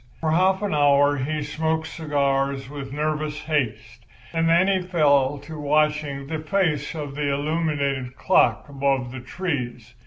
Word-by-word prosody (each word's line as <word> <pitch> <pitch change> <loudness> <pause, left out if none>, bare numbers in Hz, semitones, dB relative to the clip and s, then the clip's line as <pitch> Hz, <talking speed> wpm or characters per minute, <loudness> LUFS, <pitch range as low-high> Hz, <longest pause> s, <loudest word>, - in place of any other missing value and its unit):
For 160 -1 0
half 190 +4 +3
an 205 - -1
hour 145 -1 +4
he 150 +3 -2
smoked 160 +2 -1
cigars 140 -4 -1
with 140 -2 -7
nervous 150 +1 -2
haste, 115 -6 -2 0.3
and 165 0 +1
then 170 +3 +4
he 190 -2 +2
fell 145 -6 +2
to 155 +1 -8
watching 150 -1 0
the 155 +3 -4
face 155 -3 0
of 145 -3 -5
the 145 0 -1
illuminated 140 -3 -1
clock 110 +1 +2
above 135 -3 -1
the 130 - -6
trees. 125 -5 -4
145 Hz, 150 wpm, -24 LUFS, 135-160 Hz, 0.3 s, hour